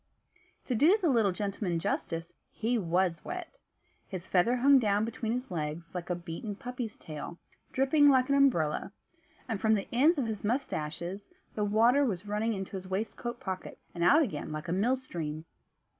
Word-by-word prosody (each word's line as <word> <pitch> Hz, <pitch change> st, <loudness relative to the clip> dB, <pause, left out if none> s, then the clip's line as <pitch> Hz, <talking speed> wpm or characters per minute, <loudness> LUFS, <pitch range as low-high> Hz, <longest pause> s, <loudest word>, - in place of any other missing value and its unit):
To 255 Hz, -, -1 dB
do 310 Hz, -, +5 dB
the 350 Hz, -5 st, +2 dB
little 225 Hz, -6 st, +3 dB
gentleman 195 Hz, -2 st, -2 dB
justice, 165 Hz, 0 st, -3 dB, 0.2 s
he 230 Hz, +2 st, -1 dB
was 175 Hz, -1 st, 0 dB
wet. 360 Hz, +7 st, -7 dB, 0.5 s
His 185 Hz, -2 st, -6 dB
feather 195 Hz, +7 st, +3 dB
hung 270 Hz, +2 st, +6 dB
down 210 Hz, -2 st, +2 dB
between 230 Hz, -1 st, -3 dB
his 250 Hz, -1 st, -3 dB
legs 160 Hz, 0 st, -4 dB
like 180 Hz, -1 st, -5 dB
a 180 Hz, -, +1 dB
beaten 175 Hz, +5 st, -6 dB
puppy's 245 Hz, -2 st, -6 dB
tail, 155 Hz, +2 st, -7 dB, 0.3 s
dripping 285 Hz, +2 st, +4 dB
like 260 Hz, -2 st, +4 dB
an 280 Hz, -, +2 dB
umbrella; 250 Hz, -, +2 dB, 0.5 s
and 220 Hz, -5 st, -3 dB
from 220 Hz, +1 st, +4 dB
the 195 Hz, -, -3 dB
ends 300 Hz, +8 st, +4 dB
of 270 Hz, -, 0 dB
his 220 Hz, -3 st, -4 dB
moustaches 195 Hz, -, -3 dB, 0.2 s
the 210 Hz, -, -1 dB
water 230 Hz, +7 st, +4 dB
was 205 Hz, -7 st, -1 dB
running 210 Hz, +2 st, 0 dB
into 190 Hz, -2 st, -5 dB
his 185 Hz, 0 st, -8 dB
waistcoat 225 Hz, +5 st, -3 dB
pockets, 185 Hz, -1 st, -6 dB
and 170 Hz, -, -2 dB
out 295 Hz, -, +6 dB
again 155 Hz, -, -4 dB
like 155 Hz, +1 st, -5 dB
a -, -, -2 dB
mill 225 Hz, +8 st, +2 dB
stream. 165 Hz, -11 st, -5 dB
210 Hz, 175 wpm, -30 LUFS, 175-250 Hz, 0.5 s, hung